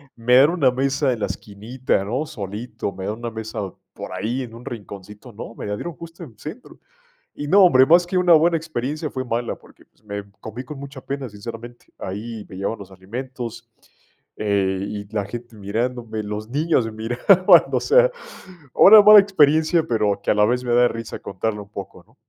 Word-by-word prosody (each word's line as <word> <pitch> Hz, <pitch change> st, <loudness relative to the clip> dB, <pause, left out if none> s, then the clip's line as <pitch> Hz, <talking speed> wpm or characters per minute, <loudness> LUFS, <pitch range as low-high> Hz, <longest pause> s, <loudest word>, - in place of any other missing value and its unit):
"Me 120 Hz, +2 st, +2 dB
dan 140 Hz, +4 st, +7 dB
una 140 Hz, -8 st, +2 dB
mesa 135 Hz, +1 st, 0 dB
en 110 Hz, -, -7 dB
la -, -, 0 dB
esquinita, 110 Hz, +1 st, -3 dB
¿no? 130 Hz, +9 st, -2 dB
Solito. 110 Hz, -4 st, -6 dB
Me 95 Hz, 0 st, -7 dB
da 105 Hz, -, -2 dB
una 120 Hz, +1 st, -6 dB
mesa 110 Hz, -1 st, -6 dB, 0.3 s
por -, -, -8 dB
ahí 115 Hz, +8 st, -3 dB
en 115 Hz, -2 st, -10 dB
un 120 Hz, -, -12 dB
rinconcito". 105 Hz, +1 st, -9 dB
¡No, 115 Hz, +2 st, -9 dB
me -, -, -7 dB
la 105 Hz, -, -2 dB
dieron 175 Hz, +9 st, -6 dB
justo 170 Hz, +2 st, -11 dB
en 115 Hz, -8 st, -13 dB
centro! 160 Hz, -, -10 dB, 0.6 s
Y 145 Hz, -, -5 dB
no, 195 Hz, +4 st, +6 dB
hombre, 130 Hz, -6 st, +6 dB
más 175 Hz, +4 st, +5 dB
que 185 Hz, -, -1 dB
una 180 Hz, -2 st, +5 dB
buena 165 Hz, +1 st, +4 dB
experiencia, 155 Hz, 0 st, -4 dB
fue 130 Hz, -1 st, -4 dB
mala 120 Hz, 0 st, -2 dB
porque, -, -, -21 dB
pues, 110 Hz, -, -37 dB
me 100 Hz, -1 st, -7 dB
comí 115 Hz, +4 st, -7 dB
con 145 Hz, 0 st, -9 dB
mucha 140 Hz, -1 st, -9 dB
pena, 135 Hz, -3 st, -5 dB
sinceramente. 115 Hz, +3 st, -10 dB
Ahí 105 Hz, +3 st, -6 dB
me 95 Hz, -, -10 dB
llevaban 100 Hz, +3 st, -3 dB
los 95 Hz, -1 st, -11 dB
alimentos, 120 Hz, +4 st, -7 dB, 0.7 s
eh, 100 Hz, -2 st, 0 dB
y 100 Hz, -1 st, -6 dB
la 105 Hz, -2 st, 0 dB
gente 120 Hz, +1 st, -9 dB
mirándome, 110 Hz, +2 st, -3 dB
los 105 Hz, +2 st, -6 dB
niños 145 Hz, -5 st, 0 dB
miraban, 120 Hz, -, +4 dB
o -, -, +1 dB
sea, -, -, +4 dB, 0.6 s
una 215 Hz, +1 st, +9 dB
mala 210 Hz, 0 st, +10 dB
experiencia, 160 Hz, -3 st, +3 dB
pero 105 Hz, -4 st, 0 dB
que -, -, -3 dB
a -, -, +2 dB
la 105 Hz, -, +3 dB
vez 125 Hz, +2 st, 0 dB
me 120 Hz, -1 st, -1 dB
da 120 Hz, 0 st, +5 dB
risa 115 Hz, 0 st, -7 dB
contarla 105 Hz, +2 st, -4 dB
un 100 Hz, -, -13 dB
poco, 100 Hz, -2 st, -9 dB
¿no? -, -, -27 dB
120 Hz, 195 wpm, -21 LUFS, 105-145 Hz, 0.7 s, mala